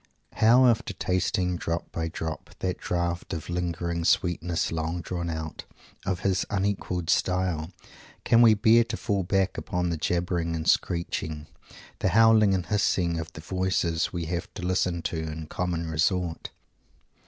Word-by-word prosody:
How, 120 +4 +5
after 115 -5 +2
tasting, 90 0 0
drop 85 0 -3
by 80 -1 -2
drop, 80 -1 -6
that 90 -1 -2
draught 85 0 -2
of 80 +1 -5
"lingered 85 -1 -2
sweetness 85 -2 +1
long 80 +2 -2
drawn 85 0 -4
out" 80 -1 -5 0.4
of 95 -2 -1
his 95 -2 +1
unequalled 95 -3 -1
style, 90 -3 0 0.5
can 115 - +5
we 115 -2 +7
bear 115 +3 +5
to 110 - -4
fall 100 -4 -1
back 95 +1 0
upon 90 -1 -2
the 85 - -1
jabbering 85 0 -1
and 80 -1 -4
screeching, 80 -3 0 0.5
the - - +1
howling 110 -3 +6
and 90 - -2
hissing, 90 -5 +1
of 80 0 -6
the 80 - -9
voices 85 -1 0
we 85 -2 -3
have 85 +2 -4
to 90 - -5
listen 90 -2 0
to 85 - -2
in 80 0 -4
common 85 0 -2
resort? 80 +2 0
90 Hz, 155 wpm, -27 LUFS, 80-95 Hz, 0.5 s, we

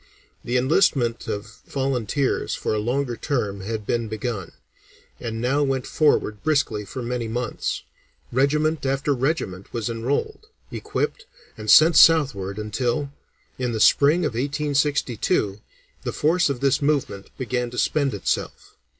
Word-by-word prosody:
The 125 - 0
enlistment 130 -3 +2
of 105 +2 -6
volunteers 135 -1 -1
for - - -2
a 105 - 0
longer 120 +3 -1
term 105 -7 -2
had 110 +1 -4
been 115 0 -1
begun, 110 -3 -4 0.7
and 115 -1 -4
now 130 +5 +1
went 135 -2 0
forward 110 -9 +1
briskly 140 -9 +1
for 125 +5 -6
many 120 -1 -3
months; 120 +1 -3 0.5
regiment 150 +4 +1
after 135 +1 0
regiment 125 - -2
was 115 -1 -2
enrolled, 140 - -2 0.2
equipped, 485 -3 -3 0.3
and 110 -1 -7
sent 160 +9 +7
southward, 135 - +5
until, 120 +6 -2 0.5
in 125 -2 -1
the 110 - -2
spring 150 +9 +5
of 150 - 0
1862, 135 -6 0 0.4
the - - -3
force 165 +2 +2
of 135 -3 -3
this 140 +2 +2
movement 140 -9 -1
began 125 -1 -2
to 125 - -9
spend 140 -4 +1
itself. 100 - -3
125 Hz, 135 wpm, -23 LUFS, 115-145 Hz, 0.7 s, sent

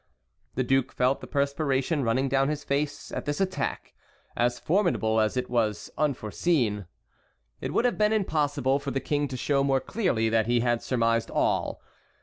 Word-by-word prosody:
The 130 - +1
duke 135 +1 +1
felt 125 +2 +1
the - - -8
perspiration 140 0 0
running 130 +4 +1
down 135 +1 +2
his 150 -1 -3
face 145 +1 -2
at - - -4
this 145 0 -2
attack, 190 -1 -2 0.4
as 120 +1 +1
formidable 160 - +1
as 110 +3 +1
it 125 0 -1
was 110 -4 -1
unforeseen. 120 - 0 0.7
It - - -4
would 240 - +1
have 245 - +1
been 210 0 +4
impossible 145 - +1
for 140 - -5
the 135 - -1
King 145 +1 -1
to 130 -1 -5
show 140 +2 +1
more 135 -1 +2
clearly 130 - 0
that 110 -1 +2
he 120 0 +2
had 120 -1 +1
surmised 115 -2 +1
all. - - 0
135 Hz, 170 wpm, -27 LUFS, 120-145 Hz, 0.7 s, been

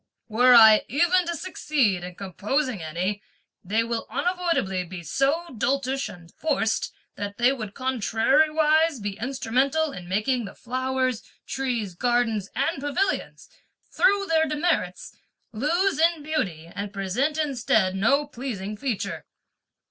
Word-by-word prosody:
Were 245 +2 +5
I 220 -2 +8
even 345 +7 +2
to 340 - -1
succeed 285 - 0
in 180 0 -7
composing 210 - -2
any, 180 +6 -3 0.4
they 215 +5 +1
will 230 0 -3
unavoidably 335 - 0
be 175 0 -8
so 275 - 0
doltish 270 +3 -1
and 170 -1 -13
forced 275 -8 -1 0.3
that 205 0 -5
they 245 +2 +4
would 215 -6 -7
contrariwise 300 +5 +2
be 205 0 -5
instrumental 270 +5 0
in 180 -8 -9
making 220 +5 0
the 195 - -10
flowers, 255 -1 -1 0.2
trees, 240 -8 -2
garden 240 +1 +1
and 275 - -1
pavilions, 355 +7 -2 0.4
through 405 -4 +3
their 320 -2 +2
demerits, 300 - -1 0.4
lose 320 - +1
in 330 -2 +2
beauty, 195 - -2
and 200 +4 -6
present 210 +10 -1
instead 245 -10 +1
no 275 +9 +2
pleasing 235 -8 -5
feature." 230 -1 -4
250 Hz, 125 wpm, -25 LUFS, 205-300 Hz, 0.4 s, I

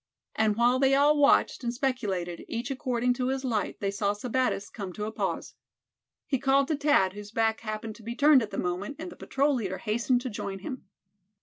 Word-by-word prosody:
And 220 -1 +2
while 240 +3 +3
they 270 0 +4
all 290 +2 +5
watched, 285 -2 +3
and 235 - 0
speculated, 210 -10 -2
each 235 +3 -4
according 250 -2 0
to 250 0 -2
his 265 0 -2
light, 220 -5 -1
they 200 -1 -1
saw 200 0 0
Sebattis 245 -1 -1
come 195 -5 -6
to 210 - -4
a 215 - -4
pause. - - -3 0.7
He 270 - 0
called 275 +1 +3
to 310 - +2
Thad, 285 -10 +3
whose 205 0 -9
back 225 0 +1
happened 215 0 -5
to - - -15
be 235 +2 -5
turned 290 0 +6
at 220 - -3
the - - -6
moment; 180 +10 -2
and 340 +3 -7
the - - -11
patrol 285 +2 0
leader 195 -7 -2
hastened 235 +3 0
to 255 - -4
join 195 -1 -4
him. 225 +6 -7
235 Hz, 210 wpm, -28 LUFS, 210-270 Hz, 0.7 s, turned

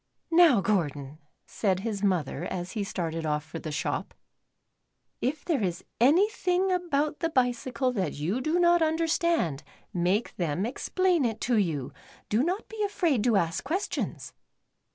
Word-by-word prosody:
Now, 325 - +6
Gordon," 150 -7 -1 0.3
said 190 -3 -1
his 210 -2 -3
mother, 175 -7 0
as 180 0 -4
he 210 - -2
started 165 -4 -3
off 150 -1 -1
for 165 +1 -8
the 155 - -6
shop, 145 - -3 0.5
" - - -52 0.3
if 280 +4 -2
there 310 -8 +1
is 180 -4 -2 0.2
anything 365 - +3
about 305 -5 0
the 330 - 0
bicycle 255 -2 0
that 185 -9 -1
you 175 - -2
do 310 +6 +1
not 345 -1 +5
understand, 320 - +1 0.3
make 185 +6 0
them 175 +2 -1
explain 355 +6 +1
it 225 -3 -1
to 245 - +1
you. 160 -10 -1 0.4
Do 215 +3 +2
not 365 +6 -2
be 445 -1 -4
afraid 340 - +1
to 235 -3 +3
ask 165 -3 0
ques 340 +9 -1
tions." - - -4
235 Hz, 155 wpm, -28 LUFS, -, 0.5 s, Now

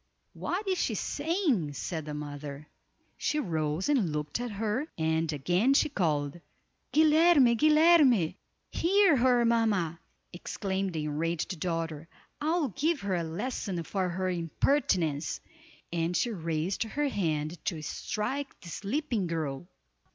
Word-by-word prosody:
"What 390 +4 -3
is 375 -1 +1
she - - 0
saying?" 295 - 0
said 160 +1 -4
the 150 -1 -5
mother. 145 0 -7 0.5
She 305 - -1
rose 160 - -1
and 250 - +2
looked 150 +5 -3
at 245 0 -3
her, 220 +7 -2
and 160 0 0
again 180 - +2
she 300 - +3
called, 155 - -1 0.5
"Guilerme! 310 -4 +5
Guilerme!" 300 - +5 0.4
"Hear 385 -2 +4
her, 245 -1 +4
mamma," 210 -8 +1 0.3
exclaimed 190 +1 -3
the 155 -2 -2
enraged 165 +4 -2
daughter, 165 -2 -3 0.3
"I'll 315 -1 +1
give 305 - 0
her 200 -1 -2
a 170 - -1
lesson 180 +1 -3
for 185 +3 -1
her 185 +2 -2
impertinence," 170 - 0 0.5
and 170 +1 0
she 240 - 0
raised 165 -1 -2
her 285 +6 0
hand 160 - -2
to 160 -4 -2
strike 265 - -3
the 170 - -10
sleeping 225 - -2
girl. 160 -2 -3
185 Hz, 130 wpm, -29 LUFS, 160-270 Hz, 0.5 s, Guilerme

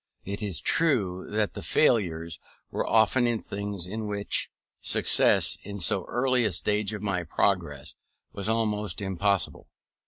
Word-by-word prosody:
It 100 +2 -4
is 95 -7 -1
true 105 - +1
the 105 0 -1
failures 85 - +1 0.3
were - - -2
often 115 +3 +4
in 120 -1 +1
things 100 -3 -5
in 110 +3 -4
which 100 0 0 0.3
success, - - +3
in 100 0 -7
so 95 0 +1
early 125 0 +1
a 110 - +1
stage 105 +3 0
of 105 - -7
my 100 -3 0
progress, 80 - -1 0.4
was 100 +1 -3
almost 105 -4 0
impossible. 100 -1 0
105 Hz, 135 wpm, -27 LUFS, 95-110 Hz, 0.4 s, often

